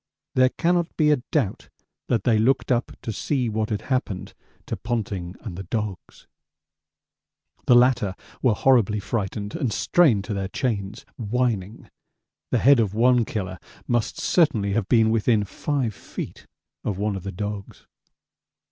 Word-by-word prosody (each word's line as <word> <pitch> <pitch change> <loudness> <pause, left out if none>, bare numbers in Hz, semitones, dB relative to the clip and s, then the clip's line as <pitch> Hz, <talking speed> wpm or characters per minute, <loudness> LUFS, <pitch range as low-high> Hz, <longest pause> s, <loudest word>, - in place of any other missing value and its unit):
There 130 0 +5
cannot 175 +3 0
be 150 -2 +4
a 145 -4 +2
doubt 130 -11 -1 0.4
that 115 -5 +1
they 115 -3 +3
looked 130 +4 +2
up 120 -1 +1
to 115 - -3
see 125 +1 -1
what 110 0 -1
had 105 - -2
happened 110 -7 -2 0.3
to - - -3
Ponting 100 -6 -3
and 105 -7 -7
the 95 - -6
dogs. 100 -1 -5 1.4
The 125 - +7
latter 120 -6 +4 0.3
were 120 -5 +3
horribly 110 -4 +3
frightened 105 -1 -3
and 135 -9 -1
strained 130 - +3
to 105 - -4
their 100 -1 -2
chains, 105 -3 -3
whining; 115 -3 -2 0.6
the - - +2
head 140 +1 +6
of 105 -3 0
one 120 +1 +4
killer 95 -4 -4 0.3
must 120 -2 0
certainly 115 - +2
have 105 -2 -1
been 110 -2 +4
within 110 -1 +2
5 125 +3 -2
feet - - -8 0.4
of 100 - -2
one 105 0 -1
of 95 - -5
the 100 - -5
dogs. 105 +1 -6
110 Hz, 150 wpm, -24 LUFS, 100-125 Hz, 1.4 s, The